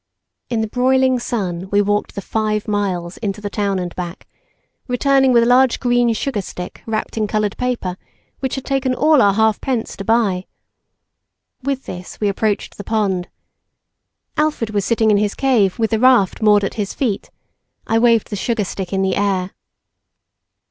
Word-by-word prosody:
In 230 -2 0
the 220 - -1
broiling 260 +2 +2
sun 190 -6 -3
we 205 - +2
walked 205 0 0
the 200 - -5
five 215 -1 -1
miles 190 -4 -2
into 210 -1 -3
the 205 -1 -5
town 200 -2 0
and 180 -1 -4
back, 175 -1 -6 0.6
returning 270 +1 +3
with 235 -1 +5
a - - +2
large 250 +1 +4
green 245 -1 +2
sugarstick 205 -8 -4
wrapped 220 0 -3
in 215 -1 +1
coloured 210 -1 -1
paper 240 -8 -2 0.4
which 265 -2 -2
had 270 - -6
taken 270 -2 0
all 300 -1 +4
our 200 -2 +4
half 220 -1 +2
pence 250 -4 -2
to 195 - -5
buy. 200 -4 +1 1.1
With 270 0 -2
this 180 0 -8
we 210 - +1
approached 205 +1 -1
the 205 - -6
pond. 195 -5 -1 1.1
Alfred 300 -8 0
was 205 -2 0
sitting 220 -2 +2
in 205 - +4
his 205 0 0
cave 235 -8 +2
with 225 -1 0
the 220 - +1
raft 245 -7 +4
moored 210 -1 +5
at 195 - -2
his 200 - -4
feet; 230 -8 -2 0.6
I 225 - +2
waved 230 -2 +3
the - - -2
sugarstick 200 -4 -2
in 195 -1 0
the 190 -1 +1
air. 195 -2 0
215 Hz, 170 wpm, -19 LUFS, 195-245 Hz, 1.1 s, with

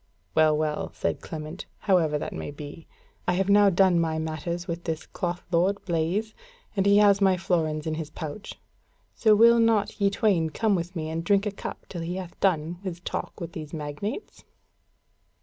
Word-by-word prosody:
"Well, 155 -1 +4
well," 155 -1 -2
said - - -2
Clement, 155 +2 -7
"however 170 -7 +3
that - - -5
may - - -5
be, 145 +2 -9 0.4
I - - +3
have 190 +2 0
now 205 0 +6
done 185 -1 +4
my 160 -1 0
matters 160 +3 -3
with 170 0 -4
this 160 -2 -3
cloth 175 0 -4
lord, 185 +4 +2
Blaise, 180 +6 -1 0.4
and 195 0 +2
he 200 0 +6
has 205 -1 +5
my 190 -2 +4
florins 160 -5 0
in 160 - -1
his 155 -1 -4
pouch: 155 +5 -7 0.5
so 215 -2 +4
will 235 +2 +7
not 225 -2 +2
ye 200 - +5
twain 195 -5 +2
come 215 +6 +1
with 175 0 -2
me 160 -1 -3
and 165 +1 -3
drink 200 +3 +3
a 210 - -1
cup 195 - -7
till 175 - -6
he 170 +2 -3
hath 185 -2 -7
done 170 -2 +1
his 185 -4 -5
talk - - -5
with 170 -1 -5
these 155 -1 -7
magnates?" 155 - -5
175 Hz, 185 wpm, -26 LUFS, 160-200 Hz, 0.5 s, will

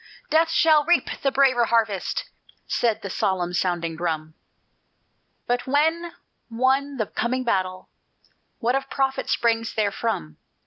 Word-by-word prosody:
Death 325 +1 +4
shall 315 -3 +4
reap 345 +3 +2
the 275 - +1
braver 260 -3 +3
harvest," 220 -5 0 0.4
said 230 -3 0
the 200 - -4
solemn 180 -2 -1
sounding 175 -2 -1
drum. 160 -2 -3 1.1
"But 245 +1 -1
when 320 +5 +1 0.4
won 265 +4 +1
the 220 - 0
coming 255 +5 -2
battle, 185 -5 -1 0.7
What 245 0 0
of 270 0 -2
profit 270 -1 -1
springs 230 -1 +1
therefrom? 200 - -2
235 Hz, 125 wpm, -24 LUFS, 190-275 Hz, 1.1 s, Death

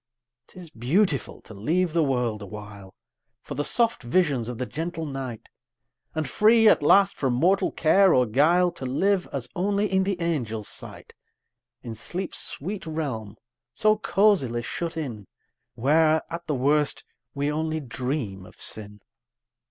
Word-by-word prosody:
'Tis 175 -4 -12
beautiful 140 - 0
to - - -13
leave 160 - 0
the 165 -1 +3
world 125 -6 -1
awhile 100 -1 -10 0.5
For - - -7
the 145 - -2
soft 235 +7 +1
visions 130 -3 +1
of 125 - -5
the 125 - -2
gentle 165 +3 -4
night; 130 -5 -6 0.7
And 155 -1 -1
free, 225 +1 +5
at - - +5
last, 195 +7 +5
from 130 -3 0
mortal 185 +9 +2
care 190 +4 +4
or 125 -4 +4
guile, 165 +10 +3
To 170 -6 -8
live 185 +8 +1
as 130 -3 -4
only 200 +3 +1
in 190 -1 +1
the 190 -1 -2
angel's 120 -11 -2
sight, - - -8 0.7
In 115 - -6
sleep's 175 - -4
sweet 185 +4 -5
realm 125 -10 -4 0.4
so 215 0 +4
cosily 195 - +2
shut 165 +7 -4
in, 115 - -5 0.5
Where, 155 +5 +3
at 170 +1 -6
the 150 - 0
worst, 145 +3 +1 0.3
we 145 +1 0
only 160 +1 -2
dream 125 -6 -4
of - - -18
sin! 105 -1 -3
150 Hz, 150 wpm, -25 LUFS, 120-180 Hz, 0.7 s, free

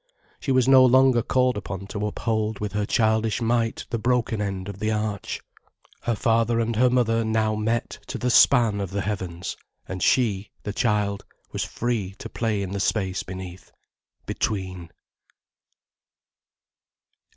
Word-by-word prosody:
She 135 - -2
was 130 -1 +3
no 135 -1 +8
longer 130 -1 +5
called 125 0 +1
upon 100 -1 -5
to 105 0 -2
uphold 110 0 -1
with 105 -1 -3
her 105 0 -1
childish 110 0 +2
might 115 -1 0
the 115 - -1
broken 120 -2 0
end 95 -2 -3
of 100 -1 -7
the 110 +1 0
arch. 105 -2 -3 0.6
Her 120 - 0
father 115 +2 +2
and 115 0 0
her 125 +3 +4
mother 115 -2 +2
now 110 -1 +1
met 110 +2 -2
to - - -4
the 125 - 0
span 115 -6 +5
of 100 - -3
the 100 +2 -2
heavens, 95 -4 -4 0.3
and 95 -1 -5
she, 105 0 +2
the 105 - -4
child, 105 -3 0 0.3
was - - -2
free 110 -6 -2
to - - -8
play 110 -4 -1
in 95 - -5
the 100 - -3
space 95 -2 0
beneath, 95 -1 -9 0.5
between. 95 -4 -3
110 Hz, 150 wpm, -24 LUFS, 100-115 Hz, 0.6 s, no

